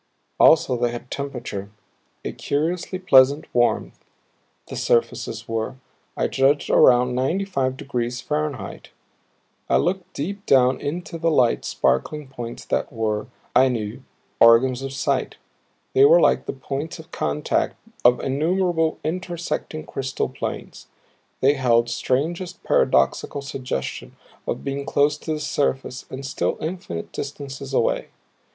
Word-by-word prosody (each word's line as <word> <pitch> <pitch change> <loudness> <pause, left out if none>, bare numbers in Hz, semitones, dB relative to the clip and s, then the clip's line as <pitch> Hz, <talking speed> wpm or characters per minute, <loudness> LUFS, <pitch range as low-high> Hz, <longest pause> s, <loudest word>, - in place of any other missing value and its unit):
Also 160 -5 +6
they 120 0 +1
had 120 +1 -8
temperature, 120 -8 -5 0.6
a - - -2
curiously 170 +5 -2
pleasant 140 -5 +5
warmth 120 -1 +1 0.6
the - - -7
surfaces 115 -1 0
were, 115 +1 -2 0.4
I - - +1
judged, 140 +2 +2
around 125 0 +5
ninety 150 +11 0
five 130 -8 -1
degrees 125 -4 -3
Fahrenheit. 145 -4 -4 0.8
I - - +4
looked 185 +1 -1
deep 200 +8 -4
down 130 -1 +4
into 170 +3 -4
the 165 +1 +2
little 125 -7 +3
sparkling 150 -3 0
points 120 -3 -7
that - - -1
were, 110 -1 -2 0.3
I 130 - +6
knew, 110 -5 -3 0.4
organs 120 +2 +6
of 135 0 -4
sight; 140 - -1 0.6
they 405 - +6
were - - +7
like - - +3
the - - -2
points 140 +3 -5
of 160 -1 -13
contact 150 - -1 0.3
of 125 0 +6
innumerable 165 +3 +1
intersecting 170 -2 -3
crystal 135 0 -3
planes. - - -6 0.5
They 135 +2 +5
held 120 -4 +2
strangest 160 +9 -2
paradoxical 140 - +2
suggestion 130 - -5 0.3
of - - -3
being 140 0 -3
close 145 +1 +2
to 160 - -5
the 155 - -3
surface 135 -3 -2
and 135 +1 -7
still 130 - -1
infinite 155 - -5
distances 140 -1 -6
away. 130 - +1
135 Hz, 130 wpm, -23 LUFS, 125-155 Hz, 0.8 s, were